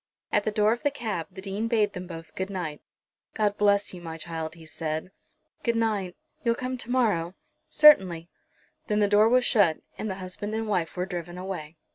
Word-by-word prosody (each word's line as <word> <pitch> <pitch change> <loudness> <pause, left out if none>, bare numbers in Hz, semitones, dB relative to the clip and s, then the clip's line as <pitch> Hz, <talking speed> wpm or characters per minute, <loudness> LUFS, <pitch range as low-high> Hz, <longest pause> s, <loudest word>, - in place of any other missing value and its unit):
At 210 - +2
the 215 - +1
door 210 +1 +3
of 240 - -6
the 290 - +2
cab 225 - -4
the 190 0 -10
Dean 200 +3 -2
bade 215 -3 +2
them 180 0 -6
both 165 -2 -9
good 190 +1 -3
night. 175 -6 -4 0.5
"God 210 -2 +1
bless 205 -1 +2
you, 180 - -8
my 165 -1 -6
child," 160 0 -5
he 165 -1 -13
said. 160 +2 -4 0.5
"Good 235 -1 +1
night; 210 -5 0 0.3
you'll 235 -2 +2
come 255 +1 -3
to 240 - -5
morrow?" 205 -9 +1 0.3
"Certainly." 185 - +6 0.6
Then 210 -1 +1
the 205 - +4
door 210 +2 +5
was 250 +1 +4
shut, 185 -8 +4 0.2
and 215 - -2
the 190 - -3
husband 190 +3 -5
and 225 0 -2
wife 180 -5 -1
were 180 - 0
driven 175 -2 -6
away. 175 -4 -6
195 Hz, 200 wpm, -27 LUFS, 170-220 Hz, 0.6 s, Certainly